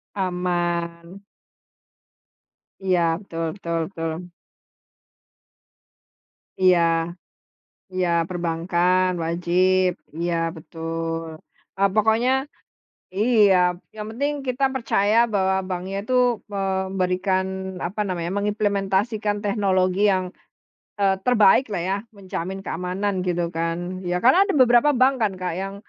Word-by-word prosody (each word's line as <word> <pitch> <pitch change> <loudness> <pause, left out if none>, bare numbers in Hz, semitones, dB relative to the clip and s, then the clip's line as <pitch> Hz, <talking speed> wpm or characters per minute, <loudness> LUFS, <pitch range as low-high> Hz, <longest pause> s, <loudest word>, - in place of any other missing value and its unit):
Aman. 175 -1 -2 1.6
Iya 180 -2 +3 0.2
betul 165 -4 -5
betul 170 -4 -3
betul. 165 -4 -4 2.5
Iya, 180 -2 +6 1.1
iya 185 -1 0 0.2
perbankan, 175 +1 +1
wajib. 180 +2 +2 0.3
Iya 170 0 -1 0.2
betul. 165 +1 -4 0.5
Eee, 200 0 +3
pokoknya 220 +3 +3 0.9
iya, 210 -3 +4 0.4
yang 210 0 -5
penting 285 +6 -1
kita 255 +2 0
percaya 220 -3 +1 0.2
bahwa 190 -1 +2
bank 180 -1 -3
nya 195 - -4
itu 255 - -2 0.4
memberikan, 190 -1 0 0.4
apa 200 +4 -5
namanya, 175 -1 -3
mengimplementasikan 205 +1 0
teknologi 190 -2 +1
yang, 185 -1 0 0.8
eee, 195 -1 +4
terbaik 245 0 +5
lah 175 -4 -1
ya, 195 - +1 0.2
menjamin 190 0 -5
keamanan 185 +4 -2
gitu 175 -1 0
kan. 165 0 -1 0.3
Ya 175 - 0
karena 260 +10 +6
ada 395 - -1
beberapa 245 +3 +5
bank 265 +2 +5
kan 210 -3 +2
Kak, 180 -2 -2
yang 195 0 -4
190 Hz, 100 wpm, -23 LUFS, 175-205 Hz, 2.5 s, Iya